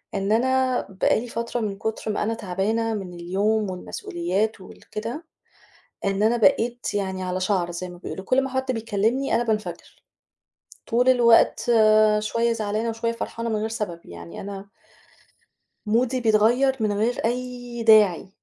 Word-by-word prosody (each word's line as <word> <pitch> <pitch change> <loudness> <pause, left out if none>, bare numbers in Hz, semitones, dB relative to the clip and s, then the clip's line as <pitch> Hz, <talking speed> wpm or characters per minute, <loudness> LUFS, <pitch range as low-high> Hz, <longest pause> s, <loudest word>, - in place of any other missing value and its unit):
إن 195 +1 -1
أنا 260 +2 +2
بقى 195 +3 +1
لي 245 - -6
فترة 235 +1 -3
من 205 -3 -3
كُتر 220 +1 -3
ما 210 - -1
أنا 225 - -1
تعبانة 220 +2 -1
من 190 -4 -5
اليوم 195 +4 0
والمسؤوليات 185 +3 -3
وال 185 - -15
كده، 235 +10 -5 0.8
إن 195 +1 0
أنا 225 +3 +3
بقيت 240 -2 +1
يعني 190 -2 -2
على 185 0 -2
شعرة 185 -2 0
زي 175 +1 -5
ما 175 0 -11
بيقولوا 190 +1 -7
كل 255 +6 +2
ما 270 - -4
حد 260 0 -1
بيكلمني 225 +3 0
أنا 240 - +2
بانفجر. 215 -2 -4 0.9
طول 245 +2 +3
الوقت 235 -3 +4 0.5
شوية 230 +2 0
زعلانة 215 +1 -2
وشوية 230 +1 -2
فرحانة 230 0 -4
من 220 - 0
غير 220 +1 -2
سبب 210 -7 -4
يعني 85 0 -9
أنا 200 0 -8 1.2
مودي 245 +4 +1
بيتغيّر 240 +4 +3
من 215 -1 +1
غير 220 +4 0
أي 245 0 -3
داعي 210 -6 +5
220 Hz, 155 wpm, -24 LUFS, 195-235 Hz, 1.2 s, داعي